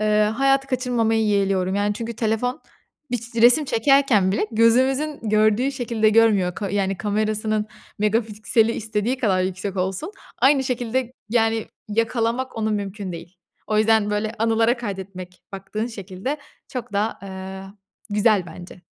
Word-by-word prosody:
eee, 215 0 +3
hayatı 270 0 +3
kaçırmamayı 240 -4 +1
yeğliyorum. 195 -2 +1
Yani, 205 +1 0
çünkü 230 +2 -5
telefon 225 +2 -1 0.5
bir 245 - 0
ç 235 +1 -11
resim 245 +6 +6
çekerken 245 -6 +3
bile 210 - 0
gözümüzün 260 +6 +2
gördüğü 215 +5 +2
şekilde 235 -4 +1
görmüyor 210 -5 +3
ka 200 -3 -4
yani, 195 -1 0
kamerasının 215 +1 -1 0.3
megapikseli 220 +1 +1
istediği 220 +3 -2
kadar 195 -7 +2
yüksek 190 +1 -3
olsun. 190 - -2 0.3
Aynı 270 0 +4
şekilde, 250 0 -2 0.2
yani, 225 -1 +1 0.2
yakalamak 230 +3 -1
onu 220 0 0
mümkün 200 -2 -3
değil. 170 +2 -10 0.3
O 215 - +1
yüzden 220 -1 +3
böyle 215 +1 -2
anılara 225 +2 +2
kaydetmek 190 -5 -7
baktığın 195 +3 -4
şekilde 205 +5 -5 0.3
çok 245 -3 -6
daha, 210 +3 -1
eee, 190 0 -7 0.5
güzel 205 -3 +2
bence. 175 +1 -11
215 Hz, 135 wpm, -22 LUFS, 200-235 Hz, 0.5 s, resim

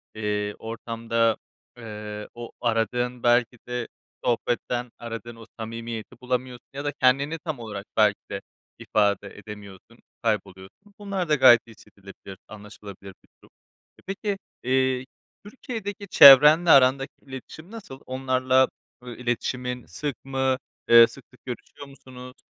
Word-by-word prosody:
Eee, 105 -1 -2
ortamda, 115 0 -1 0.4
eee, 105 -2 -8
o 120 0 -9
aradığın, 120 +1 -1
belki 120 0 +3
de 125 -1 -3 0.4
sohbetten 120 0 -1
aradığın 115 0 -7
o 115 - -13
samimiyeti 115 +1 -7
bulamıyorsun 125 0 -3
ya 140 +1 -6
da 145 - 0
kendini 140 +3 +1
tam 155 -4 -5
olarak 105 -3 -7
belki 105 -2 +4
de - - -4 0.4
ifade 100 -1 +1
edemiyorsun, 105 +2 -12 0.2
kayboluyorsun. 105 - -4
Bunlar 195 -5 -3
da 150 - +4
gayet 120 -3 +7
hissedilebilir, 100 -3 -14
anlaşılabilir 100 -2 -11
bir - - -29
durum. - - -19 0.5
E, - - -18
peki, 195 +1 -3 0.3
eee, 130 0 +1 0.4
Türkiye'deki 205 -3 -7
çevrenle 150 +3 +9
arandaki 135 0 +5
iletişim 140 - -11
nasıl? 205 -13 -10
Onlarla, 130 0 +2 0.4
ııı, 120 -1 -8
iletişimin 125 0 -3
sık 140 +10 -6
mı, 130 -1 0 0.3
eee, 115 0 +9
sık 125 +3 -14
sık 125 - -23
görüşüyor 130 +3 -8
musunuz? 130 -2 -13
125 Hz, 125 wpm, -25 LUFS, 110-135 Hz, 0.5 s, çevrenle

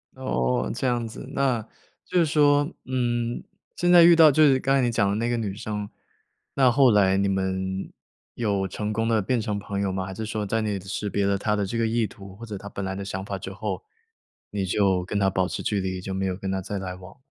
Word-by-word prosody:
哦， 65 0 -1
这 - - -3
样 120 -2 0
子， 110 - -9
那 130 -4 +1 0.4
就 180 - +1
是 170 - +4
说， 145 0 +3
嗯， 120 -2 -1 0.3
现 175 0 +2
在 175 -1 +9
遇 170 0 +8
到 160 -2 +8
就 155 +3 +4
是 135 -3 +5
刚 135 +1 +1
才 135 - +3
你 120 -1 +1
讲 110 -3 +2
的 100 - 0
那 115 +2 -1
个 120 - 0
女 105 -4 -3
生， 105 -1 -5 0.6
那 130 -2 +4
后 130 0 +5
来 95 -2 +4
你 100 0 +2
们 95 0 -2 0.4
有 100 -4 0
成 105 +3 -4
功 110 +1 0
地 115 -2 +2
变 120 +4 0
成 105 -1 -2
朋 100 0 -4
友 100 -1 0
吗？ 95 0 -3
还 95 - -6
是 110 +3 -5
说 110 -1 -3
在 110 +3 0
你 105 -2 -2
识 100 +2 -4
别 100 0 0
了 100 0 +2
她 105 +2 0
的 105 -1 0
这 105 +5 -3
个 115 - +2
意 115 0 +1
图， 100 -3 -11
或 115 +3 -9
者 105 -3 -6
她 100 +1 -9
本 100 -1 -5
来 95 - -3
的 100 +1 -5
想 95 0 -5
法 100 -1 -4
之 95 0 -7
后， 100 +2 -4 0.7
你 100 -2 -2
就 95 -1 +2
跟 105 - -3
她 95 -1 +3
保 95 -1 +1
持 - - -5
距 105 - 0
离， 95 0 -3
就 95 +1 -5
没 95 0 -2
有 95 -1 -1
跟 95 0 -4
她 95 0 -1
再 100 +2 -4
来 95 -1 -4
往？ 95 +8 -13
105 Hz, 270 characters per minute, -25 LUFS, 95-120 Hz, 0.7 s, 在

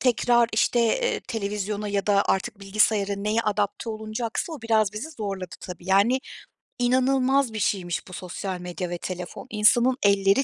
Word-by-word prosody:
tekrar, 240 -1 +3
işte, 235 +2 +2
eee, 485 - +1
televizyona 210 -2 -3
ya 200 0 -1
da 200 -1 +4
artık 195 +1 -1
bilgisayara 200 0 +2
neye 210 +3 0
adapte 210 +2 -1
olunacaksa, 220 +7 -4
o 280 -7 -8
biraz 220 -3 +2
bizi 250 +10 -6
zorladı 200 - -5
tabii. 180 -1 -9
Yani 215 +7 +4 0.6
inanılmaz 260 0 +2
bir 215 - -3
şeymiş 180 -4 -1
bu 185 - -11
sosyal 185 +1 -5
medya 180 0 -5
ve 175 - -3
telefon. 180 +7 -6
İnsanın 240 +4 +4
elleri 200 +5 +4
210 Hz, 155 wpm, -25 LUFS, 195-235 Hz, 0.6 s, da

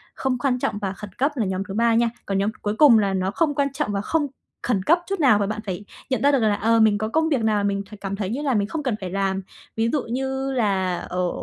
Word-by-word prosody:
Không 265 -2 -1
quan 250 0 0
trọng 205 - -1
và 195 -2 -3
khẩn 210 +1 -9
cấp 280 +4 +2
là 235 -6 0
nhóm 190 0 -2
thứ - - -4
3 230 +2 +3
nha. 235 0 +3 0.2
Còn 195 - -1
nhóm 200 +2 +1
cuối 205 0 -1
cùng 270 -7 +7
là 200 -2 +1
nó 190 0 0
không 295 +4 0
quan 280 -2 0
trọng 270 - -2
và 200 -1 -1
không 300 +7 0 0.4
khẩn 200 -6 0
cấp 335 - +4
chút 390 -1 -2
nào, 250 -8 +5
và 200 - 0
bạn 215 +1 -3
phải 190 0 -5 0.3
nhận 260 - +1
ra 285 - +5
được 275 - +3
là, 215 -3 +2
ờ, 230 +2 +2
mình 215 -2 +4
có 215 +1 -2
công 320 +6 +1
việc 270 -7 +1
nào 215 -1 +2
là 205 - 0
mình 200 0 0 0.2
cảm 195 0 -3
thấy 195 -2 -3
như 250 +7 -3
là 280 -3 0
mình 205 -1 +1
không 310 +6 -4
cần 255 -5 0
phải 185 - -4
làm. 195 0 -1 0.3
Ví 225 +1 +1
dụ 295 - +1
như 265 +3 -2
là 190 -7 0
ở 180 0 -2
220 Hz, 290 wpm, -23 LUFS, 200-265 Hz, 0.4 s, cùng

